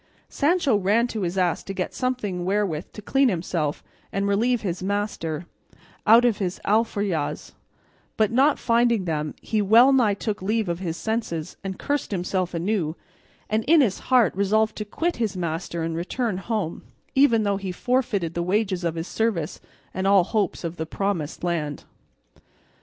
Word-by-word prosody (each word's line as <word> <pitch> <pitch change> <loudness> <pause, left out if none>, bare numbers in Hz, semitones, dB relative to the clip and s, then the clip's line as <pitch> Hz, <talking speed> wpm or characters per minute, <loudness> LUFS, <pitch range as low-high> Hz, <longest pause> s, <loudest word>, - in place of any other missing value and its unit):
Sancho 295 -4 +2
ran 205 +4 +2
to 225 -3 -4
his 180 0 -2
ass 180 -3 +1
to 195 - -7
get 185 - -3
something 230 -9 -2
wherewith 190 -4 -1
to 210 - -9
clean 270 +4 +3
himself, 165 -5 -2 0.3
and 200 0 -1
relieve 230 +4 +2
his 180 -3 -3
master, 185 -5 -2 0.6
out 230 +3 +7
of 235 -4 +2
his 185 -2 -2
alforjas; 205 -7 0 0.7
but 215 0 +2
not 275 +5 +4
finding 235 -4 +2
them, 155 -3 -2
he 215 -1 0
well 230 +7 +6
nigh 230 -6 +3
took 210 0 -3
leave 215 +2 0
of 170 0 -2
his 170 -3 -3
senses, 170 -5 -3
and 190 -1 -4
cursed 290 -1 -2
himself 185 -2 -2
anew, 170 -2 -1 0.5
and 215 +1 0
in 320 +3 +6
his 215 -8 +1
heart 250 -7 +5
resolved 215 +2 +2
to 210 - -3
quit 335 +11 -2
his 215 -5 -1
master 170 0 -3
and 165 0 -2
return 190 +5 -2
home, 200 -5 -3 0.3
even 245 -5 +4
though 200 -1 +1
he 195 -1 -4
forfeited 215 -6 0
the 170 - -2
wages 190 0 0
of 170 -1 -1
his 165 +2 -4
service 210 -9 -1 0.3
and 190 +1 -1
all 195 -2 +6
hopes 200 0 -1
of 170 0 -4
the 160 - -3
promised 180 -4 -2
island. 155 -4 -2
200 Hz, 170 wpm, -24 LUFS, 175-225 Hz, 0.7 s, out